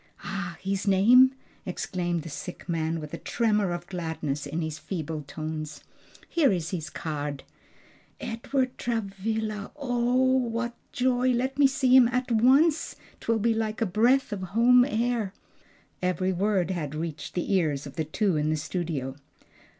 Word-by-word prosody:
"Ah! 175 -4 -4
his 195 +1 -2
name?" 245 +7 +6 0.3
exclaimed 175 -2 -2
the - - -8
sick 175 +4 -7
man, 165 -1 -1
with 150 -1 -8
a - - -4
tremor 210 -5 +1
of 175 0 -4
gladness 160 -5 -3
in 155 +4 -3
his 155 -1 -4
feeble 160 -4 -4
tones. 155 +1 -6 0.4
"Here 315 -6 +3
is 170 -4 -2
his 160 -5 -3
card." 145 -3 -4 0.8
"'Edward 255 +3 -2
Travilla!' 215 -1 -2
ah 245 -3 0
what 245 -2 +1 0.2
joy! 250 0 +2
Let 260 +3 -1
me 280 - +7
see 260 -1 +3
him 255 -2 +8
at 250 +1 -1
once. 275 +8 +4 0.2
'Twill 230 0 0
be 225 +2 +2
like 220 -1 -2
a 225 - +2
breath 235 +6 +2
of 200 - -4
home 235 +6 +5
air!" 230 -5 -1 0.7
Every 185 +1 0
word 190 -1 +1
had 155 -5 -3
reached 155 -2 -5
the 180 +3 -1
ears 150 -7 +1
of 140 - -9
the 160 - 0
two 185 +2 0
in 150 +1 +1
the 155 - +1
studio. 150 -5 -3
195 Hz, 155 wpm, -27 LUFS, 160-240 Hz, 0.8 s, him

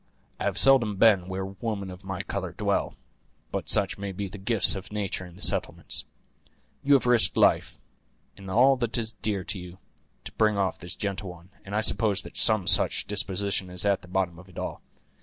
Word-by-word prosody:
I - - -3
have - - -1
seldom 125 -6 +6
been 95 -3 +4
where 95 0 -4
women 100 0 -5
of 90 +2 -12
my 95 -1 -5
color - - -5
dwell; - - -1 0.6
but - - -4
such - - +2
may 100 -1 -4
be 100 +1 -5
the 95 +2 -10
gifts 105 +1 +1
of 95 0 -8
nature 100 -3 -4
in 85 - -15
the 100 - -10
settlements. - - 0 0.8
You 140 +1 +4
have 135 - +2
risked 120 -2 +4
life, - - +2 0.6
and 95 -1 -11
all 130 +7 +4
that 120 -1 -1
is 115 -1 -1
dear 105 -3 -3
to 100 0 -4
you, 90 0 -11 0.5
to - - -8
bring 105 -2 +1
off 95 -3 -1
this 85 0 -7
gentle 100 -1 -4
one, 90 +2 -13
and 100 +1 -6
I 110 - +2
suppose 105 -2 +3
that - - -12
some 110 -5 +2
such - - +4
disposition 100 -2 -1
is 90 +2 -3
at 100 -1 +1
the 90 - -14
bottom 90 -2 -2
of 95 +1 -15
it 90 - -17
all. - - -5
100 Hz, 205 wpm, -26 LUFS, 95-110 Hz, 0.8 s, seldom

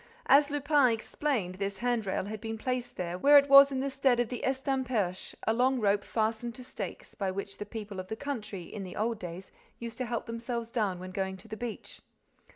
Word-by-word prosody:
As 285 +1 +6
Lupin 290 -1 +3
explained, 225 -3 -1
this 200 0 -2
hand 240 -3 0
rail 190 - -1
had 210 0 -6
been 225 0 -4
placed 250 +1 -3
where 180 +12 +5
it 280 0 +6
was 275 0 +9
in 265 -1 -1
the 275 - -1
stead 265 -2 +2
of 240 -2 +1
the 245 - -4
estamperche, 260 -8 -1
a 220 - +3
long 255 +2 +2
rope 200 -2 +2
fastened 225 +1 -1
to 255 - -10
stakes, 250 - -7
by 195 -2 -2
which 195 +1 -5
the 210 - -5
people 205 -3 -6
of 185 - -6
the 220 - -4
country, 220 -8 -5
in 205 +4 -8
the 180 -1 -8
old 225 +1 -1
days, 180 +1 -7 0.3
used 230 0 -7
to 255 - -1
help 235 0 -2
themselves 230 0 -4
down 210 -6 0
when 185 +1 -8
going 190 0 -2
to 220 - -16
the 220 - -5
beach. 235 -1 -6
230 Hz, 215 wpm, -30 LUFS, 200-255 Hz, 0.3 s, was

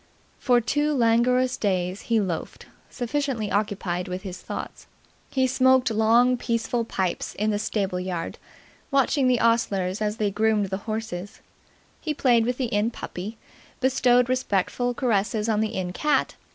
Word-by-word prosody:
For 245 -2 +3
two 295 +6 0
languorous 250 +1 +3
days 185 -2 -1
he 230 -1 +4
loafed, 180 -6 -4 0.2
sufficiently 245 -3 -2
occupied 195 -3 -1
with 180 +1 -5
his 190 -3 -7
thoughts. - - -7 0.4
He 260 -1 +1
smoked 260 -1 +3
long, 230 +3 +4
peaceful 235 0 -1
pipes 190 -5 -2
in 215 +1 0
the 205 - -1
stable 195 -4 -1
yard, 180 -2 -4 0.5
watching 275 0 +2
the 250 -2 +3
ostlers 205 -4 +1
as 210 0 -1
they 210 -2 0
groomed 210 -1 +1
the 190 - -1
horses; 215 -4 -5 0.6
he 305 -2 -3
played 240 -5 +3
with 250 0 -1
the 260 - 0
Inn 215 -1 +1
puppy, 215 -1 -7 0.4
bestowed 250 -2 +3
respectful 245 0 0
caresses 220 -2 0
on 215 -1 +1
the 220 +1 -2
Inn 180 -1 -3
cat. 300 +8 +1
225 Hz, 150 wpm, -25 LUFS, 200-250 Hz, 0.6 s, he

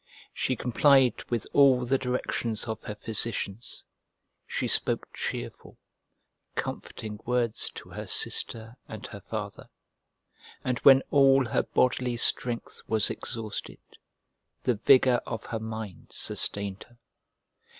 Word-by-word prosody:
She 130 - 0
complied 130 +2 +4
with 120 -3 -1
all 130 -3 +5
the 135 +2 +2
directions 120 -3 -2
of 110 -1 -4
her 105 - -5
physicians; 110 0 -3 0.6
she - - -2
spoke - - +2
cheerful, - - -5 0.8
comforting 105 -1 -5
words 120 -2 0
to - - -10
her - - -7
sister 115 +1 -1
and 110 -1 -8
her 105 - -8
father; 105 -2 -6 0.9
and 125 -1 -1
when 135 -1 +7
all 135 -2 +5
her 115 - +1
bodily 125 -1 +1
strength 120 0 -1
was 110 -2 +2
exhausted, 110 -2 -5 0.9
the 125 - +2
vigour 125 +2 +5
of 110 - -5
her 115 - -3
mind 110 -4 -7
sustained 100 -1 -2
her. 120 - -23
115 Hz, 120 wpm, -28 LUFS, 110-125 Hz, 0.9 s, when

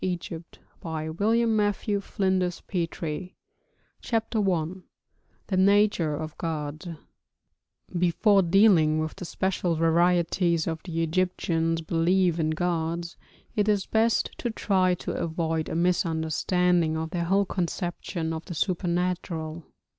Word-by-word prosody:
THE 180 -1 0 0.7
RELIGION 165 +8 0
OF 220 -2 +2
ANCIENT 195 -3 -1
EGYPT 170 0 -3 0.7
CHAPTER 225 -1 -1
I 165 -3 +1 0.8
THE 190 - -1
NATURE 195 -5 +3
OF 155 +1 -6
GODS 155 0 -4 1.1
Before 180 +4 +3
dealing 175 -4 +4
with 155 0 -2
the 185 - -6
special 180 -1 -1
varieties 170 +1 +2
of 165 0 -3
the 165 -2 -1
Egyptians' 165 -1 0
belief 170 +2 +2
in 155 -1 +1
gods, 170 0 -2 0.4
it 210 0 +2
is 205 -2 +2
best 225 +1 +1
to 240 - -1
try 190 -4 +1
to - - -5
avoid 160 -1 -2
a - - -3
misunderstanding 170 0 +1
of 160 0 -4
their 175 -2 -1
whole 195 +3 +2
conception 175 -2 -3
of 160 0 -5
the 175 - -6
supernatural. 170 -2 -2
175 Hz, 115 wpm, -26 LUFS, 160-190 Hz, 1.1 s, dealing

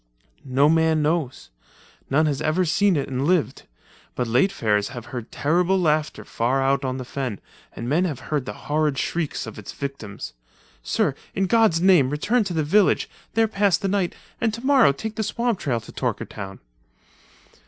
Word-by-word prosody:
"No 135 +2 +3
man 160 -1 +3
knows. 150 - -2 0.6
None 155 +4 +3
has 145 -2 -1
ever 160 +4 +1
seen, 195 +3 +3
it 140 - -2
and 130 0 -2
lived, 160 -9 0 0.5
but 125 - -1
late 125 - +2
farers 105 - 0
have 120 -3 -8
heard 120 -2 -6
terrible 180 +5 +1
laughter 155 -3 0
far 125 +4 0
out 135 0 +1
on 130 -1 -2
the 130 - -6
fen 130 -6 -4 0.4
and 115 - -5
men 160 +8 +2
have 150 -8 -3
heard 140 -4 -1
the 105 - -4
horrid 150 -2 +1
shrieks 165 +1 -2
of - - -8
its - - -8
victims. 115 - -6 0.5
Sir, - - 0 0.2
in 195 - +1
God's 220 -5 +3
name 175 -8 +5
return 210 - +1
to 190 - -3
the 160 - +1
village, 195 +6 +3 0.2
there 225 0 +4
pass 200 -3 +2
the 195 - -3
night, 195 -2 0 0.3
and 225 - +2
tomorrow 255 - +4
take 215 +11 -6
the - - 0
swamp 225 0 -1
trail 125 -5 -1
to 110 - -13
Torkertown." 95 -1 -4
155 Hz, 175 wpm, -23 LUFS, 130-190 Hz, 0.6 s, name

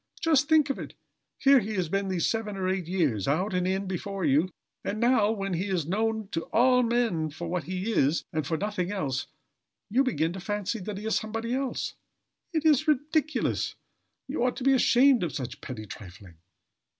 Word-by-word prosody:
Just 300 -3 +3
think 310 -3 +5
of - - -5
it; - - -8 0.4
here 275 -1 +6
he 215 -1 -4
has 185 -3 0
been 195 +4 -1
these 185 -3 0
seven 215 -3 -2
or 185 -1 -1
eight 185 -3 -1
years, 150 - 0
out 180 +8 +1
and 180 0 +1
in 190 +1 0
before 190 0 -3
you, 150 +5 +3 0.3
and 215 - -3
now, 235 -3 +4
when 195 -3 -2
he 175 +3 -1
is 180 -6 0
known 220 +4 -1
of 165 - 0
all 250 +1 +5
men 230 -10 +1
for 165 +3 -6
what 175 -1 -2
he 185 +4 -3
is, 150 -5 +2
and 155 -4 -1
for 160 - 0
nothing 200 -2 -2
else, 140 -10 -2 0.6
you 260 +5 +4
begin 170 -11 0
to 190 - -6
fancy 205 +3 -2
that 200 +1 -5
he 210 - -7
is 220 - +1
somebody 225 +2 -2
else! 265 0 -2 0.6
It 320 -2 -1
is 310 0 +4
ridiculous! 305 +2 0 0.5
You 265 -2 -2
ought 250 - +1
to 255 - -5
be 270 +1 +5
ashamed 260 0 +5
of 160 -7 -2
such 130 -4 -5
petty 110 -4 -7
trifling." 95 -3 -11
200 Hz, 200 wpm, -27 LUFS, 170-245 Hz, 0.6 s, here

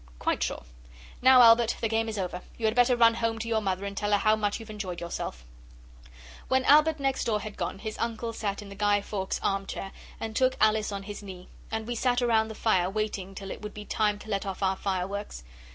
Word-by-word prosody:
'Quite - - -1
sure. - - -2 0.6
Now, 255 -1 +8
Albert, 230 0 +6
the 225 - 0
game 225 0 0
is 215 - -4
over. 180 -2 -3 0.2
You 225 - -2
had 215 - +3
better 245 +1 +4
run 230 -1 +6
home 230 -1 -1
to 225 +1 -5
your 225 -1 +1
mother 190 -1 -2
and 200 0 -5
tell 205 +1 -1
her - - +6
how 215 +2 +3
much 210 0 -1
you've 225 -1 -9
enjoyed 190 -5 -5
yourself.' 115 - -5 1.0
When 260 0 +2
Albert 305 +1 +5
next 270 -1 0
door 215 -2 +1
had 215 -2 -7
gone - - -3
his 215 +2 -6
uncle 230 0 -2
sat 210 -2 -3
in 200 - -11
the - - -8
Guy 205 0 +2
Fawkes 195 -2 -3
armchair 195 0 -2 0.3
and 220 0 -5
took 260 +1 +3
Alice 215 -1 +3
on 200 -1 -4
his 205 +1 -7
knee, 185 -3 -10 0.2
and 220 0 -3
we 240 - -3
sat 245 +1 +1
round 225 -3 +2
the 220 - -7
fire 185 -6 +2
waiting 195 -2 -3
till 195 0 -7
it - - -7
would 210 -1 -7
be 210 0 -8
time 210 -1 +1
to 210 - -13
let 195 -1 0
off 195 0 -5
our 190 0 +2
fireworks. 190 - -3
215 Hz, 230 wpm, -28 LUFS, 195-230 Hz, 1.0 s, Now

